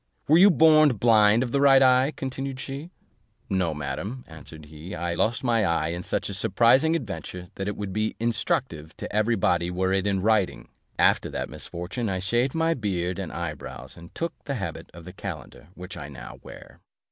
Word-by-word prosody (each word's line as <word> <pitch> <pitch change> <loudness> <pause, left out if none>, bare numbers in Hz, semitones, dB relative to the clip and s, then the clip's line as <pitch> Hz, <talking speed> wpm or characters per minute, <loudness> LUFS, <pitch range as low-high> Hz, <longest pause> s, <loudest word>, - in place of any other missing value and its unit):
"Were 160 +3 +6
you 200 +3 +8
born 155 -3 +6
blind 110 +1 +4
of 120 - -4
the 140 - +1
right 135 -1 +7
eye," 130 +2 +4
continued 135 0 -5
she? 140 +5 -6 0.6
"No, 95 -4 +1
madam," 75 - -5
answered 80 -1 -12
he; 80 +4 -9
"I 85 0 -2
lost 120 +8 0
my 115 -3 +2
eye 85 -3 0
in 85 +1 -4
such - - -2
a 100 - -5
surprising 120 - +3
adventure, 95 - -6
that 95 - -5
it 105 - -3
would 100 -2 -5
be 110 +1 -1
instructive 85 -8 -2
to - - -6
every 110 +2 +2
body 90 -3 +1
were 95 +1 0
it 95 +1 0
in 100 -1 +1
writing: 105 -1 0 0.3
after - - +3
that - - -4
misfortune 90 +7 -5
I 95 - -1
shaved 120 - 0
my 165 0 +2
beard 95 - -2
and 95 -4 -5
eyebrows, 85 -4 -7
and 85 0 -13
took 170 0 -3
the 140 - -3
habit 85 -8 -6
of 85 +1 -13
a 90 - -9
calender 75 - -8
which 90 +4 -9
I 75 - -8
now - - -10
wear." - - -13
100 Hz, 195 wpm, -25 LUFS, 85-130 Hz, 0.6 s, you